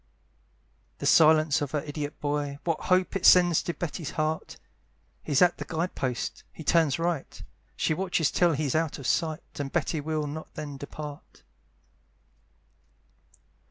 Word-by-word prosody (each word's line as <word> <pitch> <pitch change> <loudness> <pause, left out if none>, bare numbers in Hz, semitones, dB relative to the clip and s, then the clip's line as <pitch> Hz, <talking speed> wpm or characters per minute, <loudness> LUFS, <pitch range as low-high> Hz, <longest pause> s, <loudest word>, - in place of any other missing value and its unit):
The - - -6
silence 155 -1 +5
of 145 - -2
her 150 - 0
idiot 145 0 -6
boy, 145 -1 -2
What 165 -2 -2
hopes 185 +1 +2
it 185 - -10
sends 175 -3 +6
to 175 - -3
Betty's 170 -2 -4
heart! 155 0 -2 0.6
He's 145 +3 +3
at 175 -1 +2
the - - -3
guide 170 +2 -2
post 125 -3 -3
he 160 - -10
turns 160 -3 +3
right, 165 -4 -2 0.4
She - - 0
watches 175 -3 0
till 175 -2 +3
he's 145 -2 -1
out 160 -1 0
of 140 - -9
sight, 160 +2 0 0.2
And 140 -1 -3
Betty 160 -2 -1
will 155 0 -2
not 155 +2 -7
then 145 -2 -6
depart. 145 +1 -9
155 Hz, 150 wpm, -27 LUFS, 145-165 Hz, 0.6 s, sends